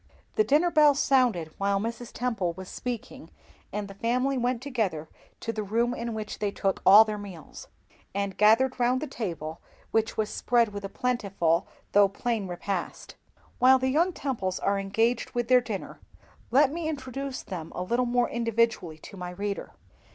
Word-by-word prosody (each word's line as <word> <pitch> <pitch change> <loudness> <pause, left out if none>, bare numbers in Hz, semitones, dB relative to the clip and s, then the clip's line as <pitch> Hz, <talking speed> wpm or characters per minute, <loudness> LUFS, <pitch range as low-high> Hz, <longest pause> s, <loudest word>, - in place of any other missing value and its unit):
The 430 - +3
dinner 330 +1 +3
bell 300 -3 +6
sounded 245 - +2
while 200 0 +1
Mrs. 230 +2 -5
Temple 220 -8 -1
was 185 +2 -9
speaking, 245 -1 -6 0.4
and 210 -1 -3
the 195 - -9
family 250 +6 0
went 245 -1 0
together 220 - -2 0.3
to 230 - -3
the 215 - -3
room 230 +4 0
in 235 -2 -4
which 215 -1 -5
they 210 - 0
took 195 -1 -1
all 205 +3 +10
their 210 -1 -4
meals, 190 -6 -10 0.4
and 200 0 -2
gathered 235 +5 +4
round 250 +1 +2
the 310 - -3
table 165 - -5 0.3
which 225 0 0
was 215 -1 -1
spread 235 -2 +2
with 205 -1 -7
a 195 - -4
plentiful, 195 -9 0 0.2
though 200 -1 +5
plain 220 0 -2
repast. 180 +1 -4 0.5
While 260 +1 +7
the 260 0 0
young 330 +7 +2
Temples 225 - -3
are 200 0 +1
engaged 225 +6 0
with 240 0 -1
their 250 -1 +6
dinner, 220 -5 -6 0.5
let 275 +3 +4
me 325 0 -3
introduce 270 -2 -5
them 170 -4 -6
a 180 - -2
little 240 +6 0
more 245 0 +2
individually 230 -8 0
to 195 - -12
my 180 -1 -5
reader. 200 +2 -5
225 Hz, 175 wpm, -27 LUFS, 195-250 Hz, 0.5 s, all